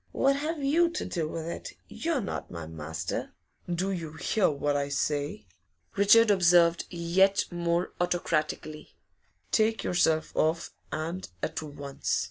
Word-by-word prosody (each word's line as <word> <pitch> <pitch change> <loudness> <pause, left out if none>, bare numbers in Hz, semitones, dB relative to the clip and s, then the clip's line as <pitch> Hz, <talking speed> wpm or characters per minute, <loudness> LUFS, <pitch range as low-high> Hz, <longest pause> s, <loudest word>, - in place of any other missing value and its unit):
'What 275 +1 +3
have 305 +1 -3
you 330 +5 +4
to 340 - -4
do 165 -4 -2
with 160 +1 -5
it? 170 - -6
You're 325 -5 -1
not 195 - -5
my 85 -2 -6
master.' 80 0 -5 0.4
'Do 185 +3 0
you 165 -5 -4
hear 185 +4 +1
what 145 0 -1
I 140 0 0
say?' 145 -4 -1 0.5
Richard 210 +2 +6
observed, 175 -3 +4
yet 185 +3 +2
more 170 0 -1
autocratically. 155 -3 -2 0.6
'Take 220 0 +2
yourself 160 -3 +1
off, 160 +1 +1 0.2
and 165 +4 -4
at 160 - -2
once! 145 -2 -3
170 Hz, 135 wpm, -28 LUFS, 155-195 Hz, 0.6 s, Richard